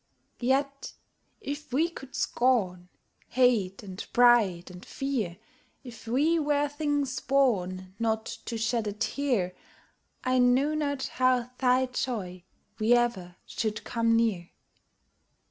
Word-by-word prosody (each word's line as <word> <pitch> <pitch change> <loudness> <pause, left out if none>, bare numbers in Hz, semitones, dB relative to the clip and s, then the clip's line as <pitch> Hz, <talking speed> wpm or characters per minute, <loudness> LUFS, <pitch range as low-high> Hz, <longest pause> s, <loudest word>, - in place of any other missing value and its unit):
Yet, 275 +2 -1 0.5
if 290 -5 -6
we 305 +7 +2
could 270 -6 -11
scorn, 190 -8 +1 0.4
Hate 230 -7 +2
and 190 0 -7
pride, 220 -8 +4
and 180 0 -11
fear; 240 -11 -3 0.5
If 235 -3 -11
we 300 +8 +2
were 290 -1 +1
things 290 -2 -1
born 185 -9 0
Not 220 -1 0 0.2
to 230 - -4
shed 225 0 0
a 205 - -2
tear, 230 -4 -1 0.7
I 255 -1 +2
know 255 +4 +3
not 285 -3 -1 0.2
how 250 -1 +3
thy 255 0 +3
joy 215 -8 -4 0.4
we 220 +2 +4
ever 230 -8 -1
should 215 -2 -3
come 230 -1 +1
near. 215 -7 0
245 Hz, 120 wpm, -28 LUFS, 210-270 Hz, 0.7 s, pride